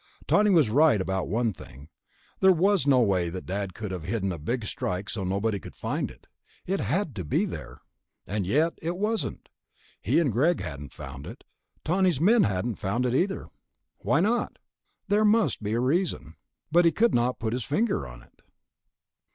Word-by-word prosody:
Tawney 210 0 +4
was 160 - +4
right 145 -3 +5
about 95 0 -2
one 115 +3 0
thing... 70 -3 -13 0.5
there 190 - +6
was 185 -1 +2
no 130 -3 +5
way 95 -6 +1
that 90 +2 -7
Dad 95 0 -4
could 105 -3 -5
have 90 -2 -4
hidden 95 +3 -2
a 85 - -5
Big 115 +9 -2
Strike 95 0 -3
so 100 - -3
nobody 100 +3 -1
could - - -11
find - - -2
it. - - -16 0.4
It 195 +2 -1
had 170 - -1
to 95 - -3
be 75 - +1
there.... - - -7 0.5
And 100 0 -2
yet 155 - +2
it 170 +2 -3
wasn't. 215 +3 -2 0.5
He - - +1
and 155 -7 +2
Greg 155 - +2
hadn't 70 -5 -7
found 70 +2 -9
it. - - -10 0.4
Tawney's 180 -3 +2
men 215 +8 +5
hadn't 100 +3 -2
found 110 +7 -1
it, 125 - 0
either. 190 +8 0 0.5
Why 165 - +2
not? 230 +5 0 0.5
There 205 +2 +3
must 210 - +3
be 105 +1 -2
a 115 - +1
reason. 130 - -1 0.4
But 175 +2 +5
he 165 - +5
could 235 +6 +2
not 120 +1 +1
put 110 -1 -2
his 125 -1 -2
finger 150 - 0
on - - -12
it. - - -26
120 Hz, 185 wpm, -27 LUFS, -, 0.5 s, there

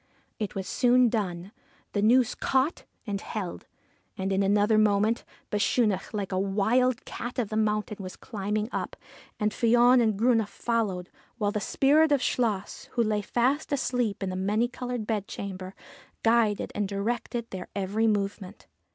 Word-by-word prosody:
It 210 -3 -3
was 190 -1 -4
soon 250 +1 +4
done. 190 -4 -3 0.4
The 205 - +1
noose 245 +3 +4
caught, 270 +5 0 0.2
and 200 -2 -3
held. 195 -5 -5 0.5
And, 195 0 -1
in 195 - +2
another 205 +2 +3
moment, 215 +2 +2 0.3
Bechunach, 205 -1 +1
like 205 -3 -3
a 185 - 0
wild 220 +6 +1
cat 240 +3 -6
of 235 -5 -1
the 215 - -4
mountain, 210 -1 0
was 185 -1 -7
climbing 210 0 -3
up. - - -3 0.4
Fion 240 +3 +4
and 220 -3 +1
Grunne 225 -1 +3
followed, 200 -4 -2 0.3
while 205 -3 0
the 210 - -2
spirit 295 +8 +3
of 285 - +4
Chluas, 215 -6 -1
who 235 - +2
lay 215 -1 0
fast 255 +9 0
asleep 245 -7 0
in 190 - -2
the - - -4
Many 210 +5 +1
coloured 245 -2 -4
Bedchamber, 195 -3 -4 0.5
guided 225 -3 +2
and 205 -1 -1
directed 230 +3 -3
their 185 -1 -6
every 205 +3 0
movement. 200 -2 -2
215 Hz, 150 wpm, -27 LUFS, 200-240 Hz, 0.5 s, soon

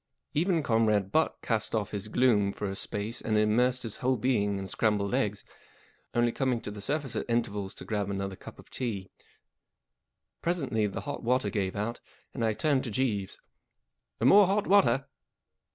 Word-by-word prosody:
Even 165 0 +1
Comrade 110 -5 +2
Butt 160 +6 +2
cast 110 -1 -1
off 105 -3 -1
his 105 0 -3
gloom 105 -4 +3
for - - -5
a 95 - -4
space 105 +3 -2
and 110 -1 0
immersed 125 +4 +2
his 115 -3 -4
whole 130 0 +1
being 105 -6 +1
in 95 - -4
scrambled 105 0 0
eggs, 105 -6 0 0.7
only 120 0 +3
coming 130 -1 0
to - - -6
the 105 0 -8
surface 145 +2 -2
at - - -3
intervals 105 -5 -1
to - - -9
grab 105 -2 -2
another 100 -1 -3
cup - - -12
of - - -16
tea* 105 -7 -3 1.3
Presently 135 -11 0
the 100 - -5
hot 145 - -5
water 125 -3 +1
gave 95 -4 -1
out, 105 +3 -3 0.3
and 115 - -3
I 110 -1 +2
turned 135 +4 +1
to - - -3
Jeeves. 105 -4 -1 0.8
11 - - +3
More 200 -1 +8
hot 200 +2 +1
water.' 190 -9 +4
115 Hz, 175 wpm, -29 LUFS, 105-130 Hz, 1.3 s, More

